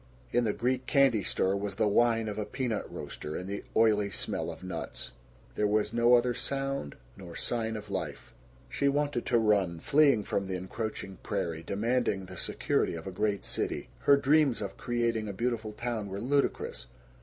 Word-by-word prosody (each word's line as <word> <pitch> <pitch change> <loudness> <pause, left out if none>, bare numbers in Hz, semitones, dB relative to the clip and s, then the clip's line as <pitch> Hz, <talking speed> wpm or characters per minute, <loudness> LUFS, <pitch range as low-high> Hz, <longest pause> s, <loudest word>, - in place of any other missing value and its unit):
In 120 0 +2
the 105 - +2
Greek 130 +1 -1
candy 135 -7 +4
store 95 +1 0
was 100 -1 -3
the 110 +1 +2
whine 115 +1 +3
of 105 0 -3
a - - 0
peanut 115 +1 -3
roaster, 75 +1 -6
and 90 - -4
the 100 +1 -4
oily 105 -2 +4
smell 100 - -2
of - - -8
nuts. 90 -3 -5 0.4
There 105 - +1
was 105 +1 +1
no 120 +1 +6
other 120 0 +3
sound 135 - -3 0.2
nor 85 -3 -10
sign 115 -2 -2
of 105 -1 -9
life. 80 -7 -4 0.3
She 140 - 0
wanted 145 -3 0
to 120 - +4
run, 100 -7 +2
fleeing 140 - +4
from 100 0 -1
the 95 - -2
encroaching 95 +1 -5
prairie, 80 -1 -2
demanding 105 +1 0
the 90 0 -10
security 85 - 0
of 80 - -7
a 95 - -4
great 100 +1 -1
city. - - -2
Her 140 - +5
dreams 140 -2 +3
of 100 -2 -4
creating 115 -2 -1
a 100 - -4
beautiful 115 0 -1
town 110 -1 -3
were 95 +1 -4
ludicrous. 130 - 0
110 Hz, 180 wpm, -30 LUFS, 100-120 Hz, 0.4 s, no